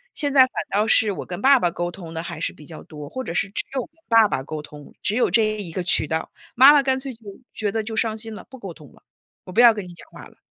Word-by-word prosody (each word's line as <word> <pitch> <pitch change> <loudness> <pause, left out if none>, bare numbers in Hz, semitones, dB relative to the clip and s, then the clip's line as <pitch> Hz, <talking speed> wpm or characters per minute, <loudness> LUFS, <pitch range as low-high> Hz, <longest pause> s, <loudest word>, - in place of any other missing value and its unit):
现 285 -2 0
在 275 - +7
反 255 - +5 0.2
倒 210 +2 +1
是 220 -1 +4
我 195 - -6
跟 180 +1 -6
爸 270 +2 +6
爸 175 - +1
沟 175 0 -4
通 175 -2 -10
得 165 0 -4
还 160 - -7
是 - - -1
比 150 - -15
较 160 +1 -10
多， 150 -1 -10
或 260 - -5
者 170 - -6
是 195 - +1
只 200 - -3
有 265 - 0
跟 250 - -12 0.2
爸 225 -2 +6
爸 130 - -1
沟 155 +2 -6
通， 150 -1 -13
只 200 - 0
有 250 - +2
这 225 - +4 0.2
一 180 -5 -6
个 185 - -3
渠 170 -3 +2
道。 160 +1 -3 0.2
妈 265 +4 +8
妈 290 - +5
干 265 -1 +1
脆 265 0 -6
就 230 - -21 0.3
觉 210 -2 -2
得 220 -1 -2
就 220 +1 -6
伤 220 0 0
心 225 0 -5
了， - - -11
不 260 - -12
沟 195 -6 -8
通 150 -4 -16
了， - - -23 0.4
我 - - -10
不 185 - -1
要 235 -2 +8
跟 205 -3 -6
你 175 - -11
讲 170 - -15
话 - - -12
了。 - - -23
210 Hz, 325 characters per minute, -22 LUFS, 170-240 Hz, 0.4 s, 妈